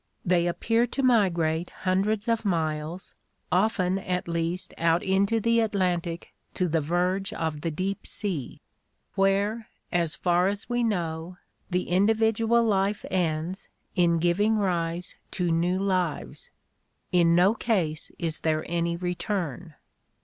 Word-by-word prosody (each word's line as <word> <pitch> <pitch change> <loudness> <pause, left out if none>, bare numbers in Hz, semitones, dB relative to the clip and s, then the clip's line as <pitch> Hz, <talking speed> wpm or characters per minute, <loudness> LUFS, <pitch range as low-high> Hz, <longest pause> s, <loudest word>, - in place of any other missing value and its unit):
They 175 -1 +3
appear 225 +7 +1
to 275 +3 -3
migrate 175 -9 +2
hundreds 200 +3 +1
of 230 -1 +1
miles, 160 -2 -2 0.4
often 190 -1 +2
at 180 -2 -2
least 170 +2 -2
out 165 +1 +2
into 195 +4 +2
the 230 +1 +2
Atlantic 180 -6 -1 0.2
to 185 - +1
the 165 0 +1
verge 180 +5 0
of 155 -2 -3
the 165 - -1
deep 185 +5 -3
sea, 180 - -4 0.5
where, 200 +3 +1 0.2
as 170 -3 +1
far 180 +1 +2
as 205 +2 -3
we 240 0 0
know, 175 -5 -2 0.3
the 180 0 -1
individual 225 +4 +3
life 205 -1 +1
ends 175 +1 -1 0.3
in 170 -2 +3
giving 180 +6 +2
rise 175 -3 -1 0.2
to 175 -2 +1
new 175 +3 +1
lives. 185 -4 -2 0.6
In 170 -2 +4
no 185 +4 +5
case 180 -10 -1
is 165 -3 -1
there 155 -1 0
any 170 0 0
return." 175 - -3
180 Hz, 130 wpm, -26 LUFS, 170-200 Hz, 0.6 s, no